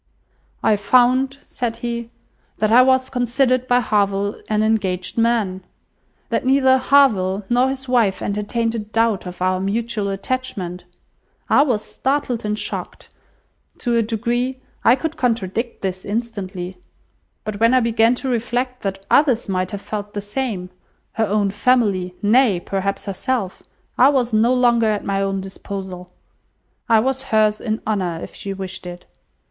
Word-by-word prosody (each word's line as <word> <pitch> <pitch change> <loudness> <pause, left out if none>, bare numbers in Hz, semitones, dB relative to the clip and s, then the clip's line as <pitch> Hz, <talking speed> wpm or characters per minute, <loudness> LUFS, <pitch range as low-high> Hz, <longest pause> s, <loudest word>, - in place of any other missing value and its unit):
"I 210 - +4
found," 255 +6 +3
said 235 -2 -3
he, 235 -1 -3 0.5
"that 215 0 +1
I 245 +2 +8
was 260 0 +3
considered 255 +1 +1
by 245 0 +3
Harville 200 -2 0
an 215 0 +2
engaged 190 -5 0
man! 225 -5 +1 0.7
That - - 0
neither 260 0 +4
Harville 210 -8 +3
nor 250 +2 +3
his 265 0 -4
wife 235 -6 +2
entertained 215 +3 -1
a 230 - -2
doubt 215 -2 0
of 180 0 -5
our 185 0 +1
mutual 210 +1 -1
attachment. 195 -4 -4 0.7
I - - +6
was 245 -7 +1
startled 265 -3 -1
and 210 0 -1
shocked. - - -6 0.7
To 240 -2 -1
a 230 - +4
degree, 240 +4 -1 0.2
I 235 - +6
could 320 +4 -4
contradict 230 -1 -1
this 185 -1 -3
instantly; 200 -5 -4 0.7
but, 210 -2 -5
when 230 +3 +4
I - - +6
began 230 0 +3
to 265 - -5
reflect 250 +1 -1
that 195 -1 -4
others 260 -6 +3
might 185 -1 -1
have 200 -1 -6
felt 205 -1 -6
the 205 - -2
same—her 205 -2 -4
own 205 -1 +1
family, 205 -5 +1
nay, 215 -3 +4
perhaps 195 +2 -3
herself—I 230 +4 -1
was 250 -5 +1
no 220 +3 +4
longer 240 -3 +3
at 210 -1 -1
my 195 0 0
own 195 0 -1
disposal. 190 -2 -7 0.8
I 225 -1 +6
was 265 +2 -1
hers 215 -1 +2
in 220 -2 -3
honour 185 -6 -1
if - - -9
she 200 - -6
wished 190 -1 -6
it. 175 0 -9
220 Hz, 150 wpm, -20 LUFS, 195-245 Hz, 0.8 s, I